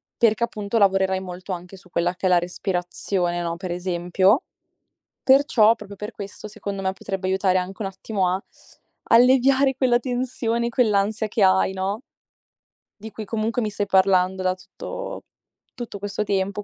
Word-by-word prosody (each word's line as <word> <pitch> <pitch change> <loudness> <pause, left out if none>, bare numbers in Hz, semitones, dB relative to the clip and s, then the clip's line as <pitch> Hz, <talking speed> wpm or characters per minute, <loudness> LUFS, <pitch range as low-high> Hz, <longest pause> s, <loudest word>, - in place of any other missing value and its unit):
perché 230 0 +2
appunto 215 -1 -2
lavorerai 190 -2 +3
molto 185 0 -6
anche 180 +2 -8
su 185 -1 -17
quella 175 +1 0
che 185 - -1
è - - +3
la 180 - +5
respirazione, 180 0 -2
no, 170 0 -3
per 180 0 -5
esempio. 180 - +1 0.8
Perciò, 255 -5 +5
proprio 205 -2 -10
per 210 +3 -6
questo 205 0 -9
secondo 200 -2 -6
me, 190 0 0
potrebbe 190 -1 -4
aiutare 190 -1 +2
anche 185 +3 -4
un - - -2
attimo 190 -1 -2
a 185 +2 -1 0.7
alleviare 265 +3 +5
quella 250 -3 +3
tensione, 245 -2 -1
quell'ansia 215 -2 +1
che 210 0 0
hai, 190 0 +4
no, 195 +5 -3 1.0
di 220 +1 -9
cui 220 - -7
comunque 225 +3 -1
mi 215 - -1
stai 205 0 -2
parlando 190 -1 +3
da 185 0 +2
tutto - - -8 0.5
tutto 235 -5 -7
questo 205 +1 -3
tempo. 200 0 -1
200 Hz, 160 wpm, -23 LUFS, 185-225 Hz, 1.0 s, la